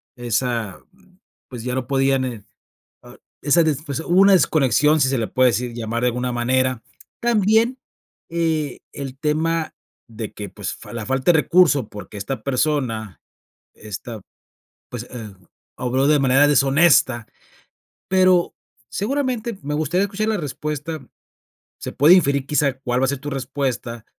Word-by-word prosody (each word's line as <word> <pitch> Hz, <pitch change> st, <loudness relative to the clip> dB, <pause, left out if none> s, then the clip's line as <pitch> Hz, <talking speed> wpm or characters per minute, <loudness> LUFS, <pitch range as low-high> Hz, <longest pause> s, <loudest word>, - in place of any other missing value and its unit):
esa 120 Hz, -4 st, -2 dB, 0.7 s
pues, 120 Hz, -3 st, -8 dB
ya 125 Hz, -, -2 dB
no 130 Hz, -1 st, -2 dB
podían 135 Hz, -1 st, +2 dB
eh, 115 Hz, -5 st, -6 dB, 0.6 s
ah -, -, -14 dB, 0.3 s
esa 150 Hz, +4 st, +4 dB
desf 150 Hz, -1 st, -1 dB
pues, 140 Hz, -1 st, -4 dB
hubo 175 Hz, +3 st, +2 dB
una 200 Hz, 0 st, +6 dB
desconexión, 150 Hz, -, +3 dB
si 130 Hz, -, +3 dB
se 135 Hz, -, 0 dB
le 110 Hz, -, -1 dB
puede 130 Hz, 0 st, +3 dB
decir 120 Hz, +2 st, -3 dB
llamar 115 Hz, 0 st, -3 dB
de -, -, +2 dB
alguna 125 Hz, +1 st, -2 dB
manera. 130 Hz, 0 st, 0 dB, 0.4 s
También, 230 Hz, +2 st, +2 dB, 0.5 s
eh, 160 Hz, -4 st, -1 dB
el 135 Hz, -1 st, -7 dB
tema 160 Hz, +2 st, -1 dB, 0.3 s
de 110 Hz, -1 st, -7 dB
que, 105 Hz, -1 st, -7 dB
pues, -, -, -5 dB
fa -, -, -12 dB
la 115 Hz, -2 st, -4 dB
falta 135 Hz, +5 st, +2 dB
de 160 Hz, -, +3 dB
recurso 150 Hz, -, +3 dB
porque 105 Hz, +1 st, -10 dB
esta 105 Hz, +7 st, -5 dB
persona 125 Hz, -7 st, -1 dB, 0.5 s
esta, 110 Hz, +2 st, -8 dB, 0.7 s
pues, 120 Hz, -1 st, -7 dB
em 110 Hz, -5 st, -8 dB, 0.4 s
obró 130 Hz, +2 st, 0 dB
de 150 Hz, 0 st, +5 dB
manera 135 Hz, +2 st, +4 dB
deshonesta, 135 Hz, -4 st, +3 dB, 0.8 s
pero 185 Hz, -2 st, +3 dB, 0.4 s
seguramente 240 Hz, -1 st, -2 dB
me 150 Hz, +1 st, -3 dB
gustaría 160 Hz, +5 st, +1 dB
escuchar 205 Hz, +2 st, -2 dB
la 220 Hz, -, +1 dB
respuesta. 150 Hz, 0 st, -5 dB, 0.7 s
Se -, -, -6 dB
puede 150 Hz, +6 st, +6 dB
inferir, 140 Hz, -6 st, +2 dB
quizá, 150 Hz, -2 st, +1 dB
cuál 125 Hz, -1 st, -1 dB
va -, -, +3 dB
a -, -, -1 dB
ser 140 Hz, -, -1 dB
tu 145 Hz, +2 st, -6 dB
respuesta, 130 Hz, -3 st, -3 dB
135 Hz, 150 wpm, -21 LUFS, 125-160 Hz, 0.8 s, una